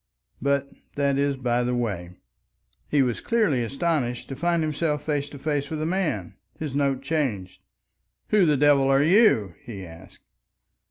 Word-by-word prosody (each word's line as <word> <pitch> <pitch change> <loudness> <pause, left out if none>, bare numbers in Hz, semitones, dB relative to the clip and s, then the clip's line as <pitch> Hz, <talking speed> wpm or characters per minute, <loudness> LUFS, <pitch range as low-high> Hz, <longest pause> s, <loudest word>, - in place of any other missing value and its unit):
But 140 0 +1 0.3
that 140 -1 +1
is 140 -1 +1
by 125 -1 0
the 125 0 0
way. 100 -8 -2 0.8
He 145 -2 +3
was 120 -3 -2
clearly 210 - +1
astonished 135 -2 -2
to 135 - -5
find 170 +2 +1
himself 155 -1 -1
face 145 -2 -1
to 145 - -10
face 145 0 -2
with 155 - -4
a 155 - -1
man. 160 - -1 0.2
His 150 -4 -5
note 140 -2 0
changed. 130 - -2 0.7
"Who 205 -5 +4
the 150 -2 +3
devil 140 -1 +4
are 135 +1 +4
you?" 160 - +4
he 100 -5 -8
asked. 85 +2 -14
140 Hz, 160 wpm, -25 LUFS, 120-155 Hz, 0.8 s, Who